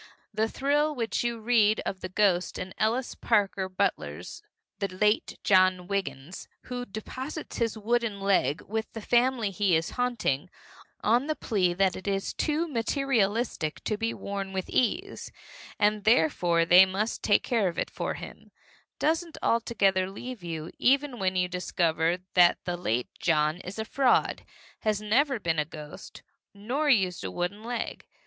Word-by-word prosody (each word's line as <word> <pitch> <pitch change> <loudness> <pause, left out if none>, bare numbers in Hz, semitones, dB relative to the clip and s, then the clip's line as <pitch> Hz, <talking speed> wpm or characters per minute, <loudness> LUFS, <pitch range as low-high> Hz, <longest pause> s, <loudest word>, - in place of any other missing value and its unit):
The 220 +1 0
thrill 295 +4 +1
with 230 -3 -2
which - - -1
you 235 -1 -2
read 220 -2 +3
of 190 - -4
the 185 - -5
ghost 185 -2 +1
in 185 0 -6
Ellis 235 +4 0
Parker 200 -4 0
Butler's 75 - -2 0.4
The 200 - 0
Late 210 +3 0
John 185 -2 +4
Wiggins, 175 -5 -4 0.2
who 245 0 -5
deposits 260 +9 -6
his 230 -2 0
wooden 225 -1 0
leg 185 -7 +1
with 220 +1 -4
the 225 - -6
family 240 -2 +2
he 195 -2 +2
is 160 0 0
haunting, 235 - -1 0.5
on 240 +6 +3
the 310 - 0
plea 185 -10 0
that 190 0 +2
it 190 - -8
is 195 -1 -1
too 315 +2 0
materialistic 230 - 0
to 215 - -1
be 225 +2 -1
worn 195 -2 -5
with 190 -1 -4
ease, 370 - -1 0.5
and 210 0 +2
therefore 170 -4 +3
they 180 +2 +8
must 195 +4 -2
take 205 - +3
care 225 -5 +1
of 170 - -4
it - - -2
for - - -3
him, - - -10 0.5
doesn't 325 +1 0
altogether 195 -5 +2
leave 240 +1 -8
you 165 -1 -5
even 275 -1 +2
when 190 -1 0
you 180 0 +2
discover 175 -2 0 0.2
that 175 -1 +6
the 175 -1 -1
late 125 -9 -1
John 155 -1 +2
is 185 +2 -8
a 220 - -3
fraud, 260 +2 +2 0.4
has 215 -2 0
never 245 +5 +1
been 165 -4 0
a - - +3
ghost 150 -1 -11 0.3
nor 255 +9 -1
used 190 - +2
a 95 - -3
wooden 180 - -3
leg. 240 0 -4
205 Hz, 160 wpm, -28 LUFS, 180-235 Hz, 0.5 s, they